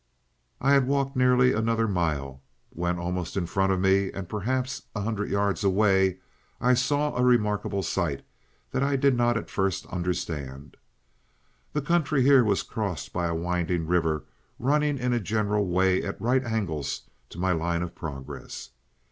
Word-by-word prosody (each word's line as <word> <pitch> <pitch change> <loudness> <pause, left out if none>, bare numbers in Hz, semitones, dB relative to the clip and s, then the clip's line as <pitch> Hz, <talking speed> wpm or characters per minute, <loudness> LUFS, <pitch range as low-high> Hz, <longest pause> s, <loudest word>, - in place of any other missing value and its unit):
"I 140 +2 +3
had 135 -2 +4
walked 140 0 0
nearly 125 0 +4
another 115 +1 +1
mile, 75 -8 -2 0.3
when 90 +1 -2
almost 90 +1 -3
in 90 - 0
front 95 +2 +1
of 95 - +1
me, 95 +1 +3
and 95 -2 -6
perhaps 125 +5 -2
a 105 - -2
hundred 105 0 -2
yards 100 0 0
away, 95 -1 +3 0.4
I 125 +1 +3
saw 145 +4 +1
a 125 - +1
remarkable 105 -5 +2
sight 85 -5 -1 0.5
that - - -1
I 140 0 +2
did 135 -1 +3
not 120 -1 +2
at 115 - -6
first 95 -2 -1
understand. 75 -6 -4 1.0
The 150 - -1
country 155 -4 +2
here 135 -1 +6
was 100 -3 +1
crossed 100 -7 -4
by 90 -1 0
a 85 - -2
winding 85 0 -1
river 80 -3 0 0.3
running 145 +2 +1
in 125 -1 0
a 120 - +2
general 105 -1 0
way 95 +1 +2
at 100 - -5
right 125 +3 +2
angles 95 - -2 0.3
to - - -12
my 95 +1 +1
line 85 0 0
of 90 - -6
progress. 70 -5 -8
100 Hz, 165 wpm, -26 LUFS, 90-125 Hz, 1.0 s, here